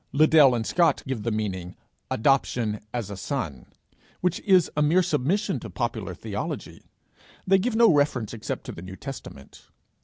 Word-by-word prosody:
Liddell 150 -3 +6
and 115 -1 -2
Scott 170 0 +2
give 130 -4 -3
the 115 - -1
meaning 95 -5 -3 0.3
"Adoption 115 -4 +1
as 115 -5 -4
a - - -5
son," 95 - -4 0.5
which 180 -1 0
is 185 -4 +4
a 150 - +1
mere 165 +5 +4
submission 160 +7 0
to - - -8
popular - - -3
theology: - - -5 0.6
they 195 0 +4
give 230 +4 -1
no 230 -5 +6
reference 140 -7 +1
except 110 -2 -5
to - - -7
the - - -9
New 95 +1 -8
Testament. 110 - -10
135 Hz, 160 wpm, -25 LUFS, 105-160 Hz, 0.6 s, Liddell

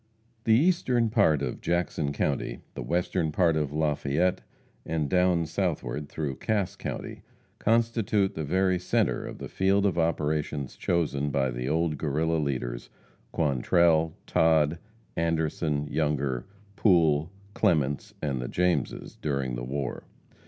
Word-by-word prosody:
The 110 - +5
eastern 125 -6 +2
part 80 - +3
of 65 - -4
Jackson 85 -4 0
county, - - -2
the - - -6
western 85 -1 0
part 85 0 +3
of 75 -3 -1
Lafayette, 75 +3 0 0.4
and 80 -3 -1
down 90 0 +2
southward 80 -3 -2
through 70 -4 -3
Cass 105 -4 -1
county, - - -6 0.4
constitute 115 -3 +2
the 80 - -4
very 95 +4 +1
center 90 - 0
of - - -7
the - - -6
field 100 +1 +2
of 95 -3 +1
operation 75 -3 0
chosen 75 -2 -1
by 65 -2 0
the 60 +2 -3
old 80 -2 0
Guerrilla 80 +2 0
leaders 60 -5 -3 0.4
Quantrell, 80 +2 +2
Todd, 80 0 +3 0.4
Anderson, 80 -2 0
Younger, 70 -5 -1 0.3
Pool, 80 -7 +3 0.2
Clements, 75 -11 +1
and 70 -4 -1
the - - -4
Jameses 90 +4 -1
during 70 -4 -1
the - - -4
war. 65 0 -4
80 Hz, 130 wpm, -27 LUFS, 70-90 Hz, 0.4 s, The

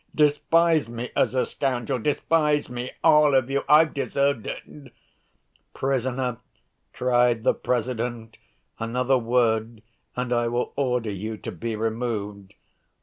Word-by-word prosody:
Despise 155 -1 +3
me 120 +1 -6
as - - +1
a 130 - +2
scoundrel, 125 -3 -2
despise 150 +3 +1
me, 125 +1 -4
all 150 -3 +5
of 130 0 +2
you! 140 0 0
I've 155 +1 +6
deserved 140 -4 0
it!" 140 -4 -9 0.8
"Prisoner," 130 -2 -1 0.5
cried 120 -2 +2
the - - +3
President, 120 -2 -3 0.4
"another 125 +3 +1
word 115 -2 0 0.3
and 125 0 -2
I 120 0 +1
will 120 +1 -2
order 125 -5 -1
you 110 +3 -5
to - - -7
be 110 +6 -4
removed." 105 -3 -4
125 Hz, 125 wpm, -24 LUFS, 115-140 Hz, 0.8 s, I've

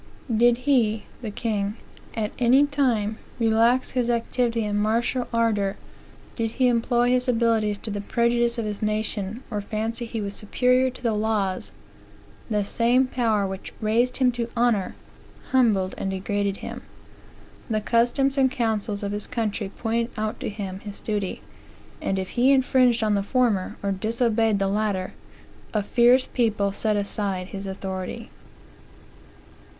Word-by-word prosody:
"Did 240 +1 +5
he, 225 -7 +2 0.2
(the 225 - -4
king,) 210 -1 -2 0.4
at 220 -2 -1
any 255 +4 +5
time, 240 -7 0 0.2
relax 230 +2 +3
his 245 -2 0
activity 235 -1 0
and 205 0 0
martial 235 +4 0
ardor, 215 -4 +1 0.6
did 225 -1 -1
he 255 0 +3
employ 240 +1 +2
his 250 +1 +2
abilities 225 -3 +2
to 215 - -7
the 205 0 -3
prejudice 235 +2 +1
of 230 - -2
his 210 -1 -4
nation, 215 +1 -2
or 210 -2 -2
fancy 225 +3 -3
he 225 0 -4
was 200 -1 -4
superior 250 +5 +2
to 255 0 -12
the 230 -2 +1
laws; 210 -3 -1 0.8
the 210 -2 0
same 240 +5 +3
power 225 -5 +1
which 190 0 -6
raised 235 +3 +1
him 255 -2 +3
to 235 -1 -3
honor, 230 -5 +1 0.6
humbled 215 -8 +3
and 195 - -2
degraded 200 +1 -1
him. - - -6 0.9
The 215 -1 +1
customs 245 +5 +2
and 265 -1 +4
councils 220 -4 -1
of 200 - -2
his 205 0 -2
country 220 -4 -2
pointed 230 +3 -2
out 215 0 -2
to - - -3
him 195 -3 -5
his 205 0 -8
duty; 205 -3 -3 0.6
and 195 - -1
if 190 -1 -3
he 255 +3 +3
infringed 255 -3 +3
on 215 -1 +2
the 200 - +2
former, 215 -3 0
or 200 - 0
disobeyed 225 +1 +1
the 195 0 0
latter, 200 -2 -1 0.6
a 210 - +2
fierce 245 +4 +4
people 215 -5 0
set 215 +2 0
aside 200 -2 -2
his 195 0 -6
authority. 190 +3 -5
220 Hz, 150 wpm, -24 LUFS, 205-240 Hz, 0.9 s, Did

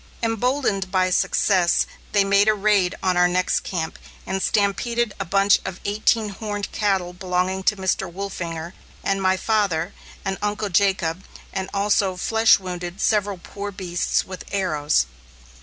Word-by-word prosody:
Emboldened 225 -4 0
by 185 -1 +2
success, 180 -1 +3 0.3
they 205 -1 +4
made 200 +1 +4
a 215 - +5
raid 200 -3 +2
on 185 -1 +2
our 180 0 +5
next 180 +1 +1
camp 165 -4 -4 0.3
and 190 +1 -2
stampeded 220 +3 +1
a - - -2
bunch 195 +3 +4
of 190 -1 -6
eighteen 215 +1 +1
horned 205 0 -5
cattle 190 -4 0
belonging 185 +1 -1
to 210 +2 +2
Mr. 190 -1 -1
Wolfinger 170 -3 -5 0.3
and 195 0 0
my 190 0 +2
father 200 -5 0 0.3
and 195 0 -2
Uncle 210 0 -1
Jacob, 190 -2 +1 0.3
and 190 -1 -3
also 200 -1 +1
flesh 225 +5 +4
wounded 180 -1 -6
several 205 -3 +1
poor 200 +3 -7
beasts 180 -3 -1
with 185 -1 -8
arrows. 155 - +1
195 Hz, 145 wpm, -23 LUFS, 180-205 Hz, 0.3 s, a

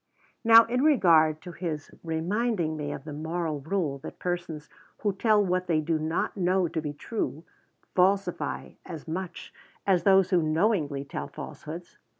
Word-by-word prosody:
Now, 230 0 +9
in 250 +3 0
regard 165 - +5
to 180 - -7
his 160 -4 -5
reminding 170 +1 -1
me 145 -1 -4
of - - -6
the 150 -1 -7
moral 160 0 -3
rule 155 -2 -2
that - - -9
persons 175 -4 -4 0.3
who 205 -2 +1
tell 210 +1 +3
what 185 0 0
they 165 -3 +2
do 155 +1 0
not 160 +2 -1
know 185 -1 +2
to 160 0 -3
be 150 -1 -3
true, 155 +1 -4 0.5
falsify 190 0 +1
as 165 -2 -8
much 175 +1 -5 0.3
as 185 -3 +3
those 190 -2 +4
who 180 -2 +4
knowingly 155 -4 +1
tell - - -5
falsehoods. 170 +3 -9
170 Hz, 155 wpm, -27 LUFS, 155-195 Hz, 0.5 s, Now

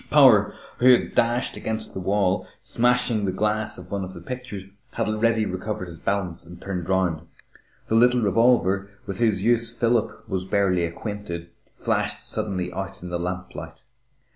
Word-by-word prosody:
Power, 115 -9 +6 0.2
who 130 +1 +7
had 120 - +1
dashed 120 +1 +1
against 110 0 -4
the - - -4
wall, 95 0 +1
smashing 120 -2 +2
the 95 - 0
glass 105 +2 -1
of - - -11
one 100 -1 -1
of 95 0 -7
the - - -7
pictures, 125 0 -6 0.3
had - - -1
already 110 0 +2
recovered 95 0 -4
his 85 -1 -10
balance 90 -4 -2
and 85 +1 -12
turned 90 -2 -4
around. 90 -4 +1 0.6
The - - -3
little 125 +2 +5
revolver, 100 -3 +3 0.2
with 95 -1 -4
whose 110 -5 +2
use 115 0 +2
Philip 115 -2 0
was 95 -3 -2
barely 95 -2 +2
acquainted, 85 -1 -6 0.2
flashed - - -1
suddenly 90 -3 -2
out 95 +1 -6
in 90 - -6
the 85 - -1
lamplight. 90 +1 -5
100 Hz, 165 wpm, -24 LUFS, 90-115 Hz, 0.6 s, who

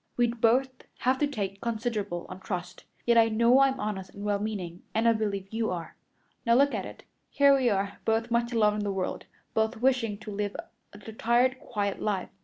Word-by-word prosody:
We'd 240 -1 +1
both 255 +4 +4 0.3
have 260 +1 +2
to 295 - +2
take 200 -8 -4
considerable 215 -6 -2
on 185 - -9
trust. 180 -2 -6 0.2
Yet 235 -1 +5
I 225 0 +5
know 235 +4 +4
I'm 270 -1 +3
honest 195 -3 -3
and 200 - -7
well 205 -1 +1
meaning, 190 -5 -4
and 225 +1 +3
I 230 - +6
believe 200 -3 -2
you 225 0 0
are. 170 -2 -5 0.5
Now 235 0 +4
look 280 +3 +4
at - - -3
it. - - -12 0.3
Here 280 -1 +5
we 260 -3 +2
are, 200 -1 -1
both 225 +1 0
much 235 +1 +1
alone 210 -3 +3
in 210 - -2
the 200 - -1
world 190 -1 -3 0.3
both 220 +2 +1
wishing 240 -4 +1
to 215 - -7
live 205 0 -3
a - - -12
retired, 240 +4 +1
quiet 205 -3 -3
life. 200 -3 -1
220 Hz, 205 wpm, -28 LUFS, 200-240 Hz, 0.5 s, I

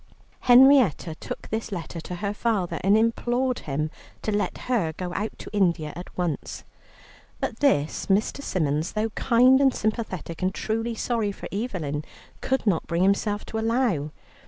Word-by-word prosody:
Henrietta 250 - +6
took - - -7
this 220 0 -3
letter 170 -2 -5
to 180 - -6
her 200 +3 -2
father, 200 -7 -1
and 200 +3 +5
implored 240 +3 +1
him 150 +2 -3 0.3
to 215 - -1
let 205 - -1
her 215 -11 0
go 180 +2 -5
out 210 +4 -3
to - - -10
India 170 -6 +1
at 175 - -10
once. 175 -4 -3 0.8
But - - -3
this 155 - +1
Mr. 205 +7 +1
Symons, 155 - -1
though 215 +1 -1
kind 255 +4 +4
and 270 -2 +4
sympathetic 210 -7 -3
and 185 +1 0
truly 225 +1 -2
sorry 225 -2 -1
for - - -8
Evelyn, 180 - -3 0.4
could 265 -2 0
not 185 -7 +1
bring 170 +2 +1
himself 205 +2 +1
to 220 - -4
allow. 225 - +1
205 Hz, 160 wpm, -25 LUFS, 170-230 Hz, 0.8 s, Henrietta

